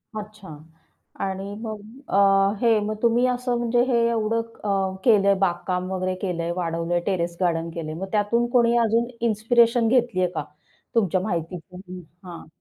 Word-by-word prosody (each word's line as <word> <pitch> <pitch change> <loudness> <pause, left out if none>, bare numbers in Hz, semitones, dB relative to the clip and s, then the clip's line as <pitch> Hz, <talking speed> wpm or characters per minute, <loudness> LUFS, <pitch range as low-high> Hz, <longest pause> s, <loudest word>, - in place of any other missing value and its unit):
अच्छा 210 -3 -8 0.8
आणि 195 +1 -5
मग 220 -2 -5 0.3
अ, 195 0 +4
हे 230 -2 +4
मग 215 - -2
तुम्ही 235 +1 +3
असं 250 -1 -1
म्हणजे 240 0 +1
हे 250 -3 +2
एवढं 230 0 0 0.2
अ, 195 -2 0
केलंय, 200 -4 +5
बागकाम 180 0 -1
वगैरे 185 0 -2
केलंय, 170 -3 -2
वाढवलंय, 170 0 -1
टेरेस 175 -3 -1
गार्डन 170 -2 0
केलंय. 160 -2 -6
मग 185 +5 -5
त्यातून 220 +3 +1
कोणी 235 -1 +3
अजून 230 +1 +1 0.2
इन्स्पिरेशन 230 +2 +3
घेतली 240 -5 +2
आहे 180 - +2
का 150 - -2 0.5
तुमच्या 190 -5 +2
माहितीतून? 180 -1 -5
हं, 185 0 -7 0.3
हां. 170 - -10
200 Hz, 150 wpm, -23 LUFS, 180-230 Hz, 0.8 s, केलंय